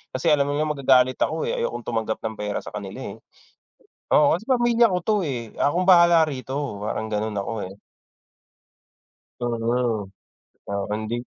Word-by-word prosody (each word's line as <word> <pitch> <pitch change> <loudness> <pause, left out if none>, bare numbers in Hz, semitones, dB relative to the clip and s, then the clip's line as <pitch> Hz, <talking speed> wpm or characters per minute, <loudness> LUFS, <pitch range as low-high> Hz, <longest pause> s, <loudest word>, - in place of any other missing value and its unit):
Kasi 155 +5 +2
alam 140 -1 +3
nila 145 +2 0
magagalit 130 -4 +3
ako, - - 0
eh, 480 +1 -2
ayokong 480 0 -3
tumanggap 110 -1 -2
ng 110 -1 -5
pera 105 -1 -3
sa - - -9
kanila, 100 -2 -6
eh. - - -10 1.0
Oo, 150 0 +5
kasi 180 - -3
pamilya 240 -3 +4
ko 180 - +1
'to, 215 - +3
eh. 120 -8 -4
Akong 175 +6 +1
bahala 170 -3 +6
rito, 135 -5 -4
parang 110 +1 -3
ganun 105 -1 -2
ako, 100 +4 -3 0.2
eh. - - -11 1.7
Solo. 115 -2 -1 0.6
O, 100 0 -3
Hindi 110 +3 -3
130 Hz, 155 wpm, -23 LUFS, 110-165 Hz, 1.7 s, bahala